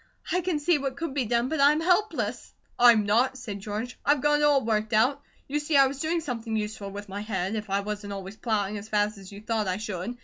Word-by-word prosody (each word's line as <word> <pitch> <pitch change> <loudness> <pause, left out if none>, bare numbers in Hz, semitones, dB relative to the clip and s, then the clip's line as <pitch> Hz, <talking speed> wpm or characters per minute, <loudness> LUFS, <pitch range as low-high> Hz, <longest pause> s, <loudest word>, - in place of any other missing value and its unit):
"I 365 - +2
can 355 -3 -1
see 300 +1 +2
what 275 -1 -3
could 330 -2 -4
be 270 -3 0
done, 235 +2 +1
but 315 +2 -2
I'm 295 +2 +5
helpless." 365 +6 0 0.2
"I'M 235 -3 +6
NOT!" 245 +6 +2
said 215 -6 -6
George. 215 +5 -5
"I've 290 0 +3
got 295 +1 +3
it - - +1
all 285 -4 +4
worked 215 -1 0
out. 255 +7 +3 0.3
You 295 +2 -1
see 295 0 +1
I 275 - +7
was 270 +1 -3
doing 330 +3 0
something 230 -6 -4
useful 210 -2 -3
with 205 +1 -8
my 200 +1 -5
head, 195 -2 -2
if 215 -2 -4
I 200 +1 +1
wasn't 205 0 -5
always 195 +1 -7
plowing 210 -3 -1
as 210 +2 -11
fast 210 -1 0
as 195 0 -12
you 200 +1 -10
thought 215 -1 -1
I 185 0 0
should. 215 +2 -5
225 Hz, 245 wpm, -27 LUFS, 205-280 Hz, 0.3 s, I